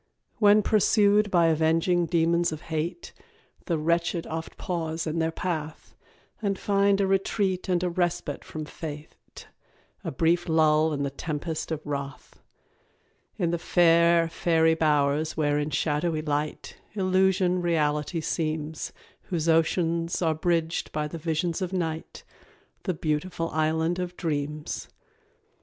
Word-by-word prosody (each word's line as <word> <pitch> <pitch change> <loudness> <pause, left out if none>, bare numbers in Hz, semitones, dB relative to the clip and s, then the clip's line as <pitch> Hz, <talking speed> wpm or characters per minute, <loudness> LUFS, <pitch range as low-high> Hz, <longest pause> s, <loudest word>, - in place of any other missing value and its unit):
When 210 -1 +6
pursued 210 0 +3
by 175 -3 +4
avenging 165 +2 +2
demons 170 +1 +2
of 155 -1 -6
hate, 170 - -4 0.5
The 170 -4 0
wretched 170 +2 0
oft 160 0 -6
pause 165 -2 -3
in 160 +1 -2
their 160 0 +1
path, 160 -2 -5 0.5
And 200 -2 0
find 200 0 +2
a 200 - +3
retreat 190 -1 0
and 180 -1 +1
a 180 - +1
respite 170 -4 -2
from 155 -1 -6
fate 150 -1 -9 0.6
A - - -3
brief 170 +4 +1
lull 155 0 +4
in 140 -1 -2
the 140 - -2
tempest 155 +2 -4
of 155 -1 -4
wrath; 140 -1 -6 1.0
In 175 -5 0
the 170 - -1
fair 170 -1 +4
fairy 160 -1 +2
bowers 150 -1 +1
where 145 -1 +1
in 150 +1 -1
shadowy 155 +2 0
light, 150 0 -3 0.2
Illusion 185 -1 +2
reality 155 -1 0
seems, 155 -1 -3 0.3
Whose 170 -4 -2
oceans 165 +1 +1
are 165 -3 +2
bridged 165 0 -1
by 150 0 -2
the 165 +2 -7
visions 165 +3 -1
of 185 -1 -2
night 165 -3 -3 0.6
The 185 -4 -1
Beautiful 165 +2 -2
Island 160 +3 0
of 180 0 -4
Dreams. 150 -1 -3
165 Hz, 135 wpm, -26 LUFS, 155-175 Hz, 1.0 s, When